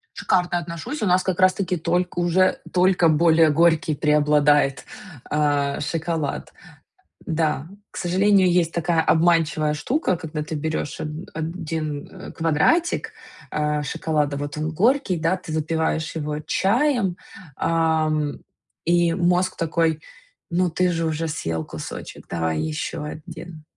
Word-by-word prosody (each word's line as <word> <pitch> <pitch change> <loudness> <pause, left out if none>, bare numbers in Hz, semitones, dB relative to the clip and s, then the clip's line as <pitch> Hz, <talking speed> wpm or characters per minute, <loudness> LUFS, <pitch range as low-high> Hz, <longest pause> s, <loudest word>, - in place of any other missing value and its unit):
Шикарно 180 -1 +1
отношусь. 170 - -6
У 210 - +1
нас, 180 +1 +3
как 185 -1 -2
раз 185 0 +5
таки, 185 -2 -1
только 175 +2 -1
уже 180 +2 +2
только 180 -2 +4
более 160 0 +4
горький 165 +1 +3
преобладает, 145 -2 +3 0.5
а, 145 -2 +1
шоколад. 160 -1 -3 0.7
Да, 155 -2 -1 0.2
к - - -10
сожалению, 190 +1 +3
есть 170 -2 +2
такая 170 -1 +1
обманчивая 160 -2 +2
штука, 235 - 0
когда 155 -2 -5
ты 155 +1 -5
берешь 155 0 -3
од 150 - -3 0.3
один, 160 -3 -4
э, - - -10
квадратик, 165 - +1 0.4
а, 150 0 0
шоколада, 145 0 -1
вот 145 +1 -5
он 155 +1 -2
горький, 220 - +2
да, 165 +3 +1
ты 180 -3 -9
запиваешь 160 0 -1
его 150 -1 -3
чаем, 205 - +1 0.4
а, 160 -1 +1
м, 150 -1 -2 0.4
и 170 0 +3
мозг 180 +1 +1
такой: 165 -1 0 0.5
ну, 175 +1 +1
ты 180 +2 +1
же 165 -1 -1
уже 160 +1 -1
съел 80 - -3
кусочек, - - -8
давай 80 -2 -1
еще 80 - -3
1, 160 0 -9
165 Hz, 135 wpm, -23 LUFS, 150-175 Hz, 0.7 s, раз